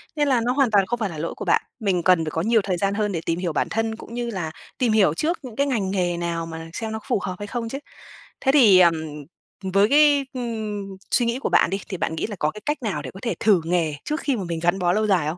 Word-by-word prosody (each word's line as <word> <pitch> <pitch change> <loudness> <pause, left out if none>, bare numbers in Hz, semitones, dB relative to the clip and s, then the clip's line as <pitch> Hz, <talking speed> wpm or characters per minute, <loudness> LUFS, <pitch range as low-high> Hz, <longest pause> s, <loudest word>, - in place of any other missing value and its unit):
Nên 295 -1 +1
là 255 -4 +3
nó 245 - +2
hoàn 270 -5 +2
toàn 200 -2 +4
không 240 +3 -3
phải 215 -3 -1
là 160 - -8
lỗi 165 +2 -4
của - - -6
bạn. - - +3 0.2
Mình 190 -6 0
cần 180 -3 +4
phải 155 - -3
có 160 - -1
nhiều 225 +3 +3
thời 185 -2 -1
gian 195 +2 0
hơn 210 0 0
để 165 -4 -2
tìm 165 +1 -1
hiểu 175 -4 -2
bản - - 0
thân 225 0 -1
cũng 230 - -11
như 240 0 -3
là 175 -7 -4 0.3
tìm 245 -4 +2
hiểu 210 -8 +4
trước 320 - -1
những 245 -4 -9
cái 280 0 +1
ngành 210 -8 -1
nghề 175 -3 0
nào 170 -1 -2
mà 165 0 -8
xem 220 +4 -4
nó 220 - -3
có - - -22
phù - - +2
hợp 180 - -3
hay 205 - -5
không 230 0 -4
chứ. 270 - -4 0.6
Thế 270 - +3
thì, 215 -10 +7
ờm, 170 -2 +6 0.8
với 200 +2 +4
cái, 290 0 +5
ừm, 220 -5 -4 0.3
suy 240 - +3
nghĩ 235 +2 -1
của - - -2
bạn - - +4
đi 195 - -2
thì 190 - -4
bạn 160 - -2
nghĩ - - -2
là 210 - -6
có 150 - +1
cái 210 - -11
cách 295 -3 -2
nào 210 - -2
để - - -7
có 190 - -11
thể 235 - 0
thử 205 -5 +4
nghề 165 -3 +1
trước 300 +2 -2
khi 275 -3 0
mà 200 - -3
mình 170 -2 -3
gắn 175 +3 +2
bó 175 -1 +2
lâu 215 +2 +1
dài 180 -7 +2
không? 160 +3 -3
205 Hz, 300 wpm, -23 LUFS, 175-235 Hz, 0.8 s, thì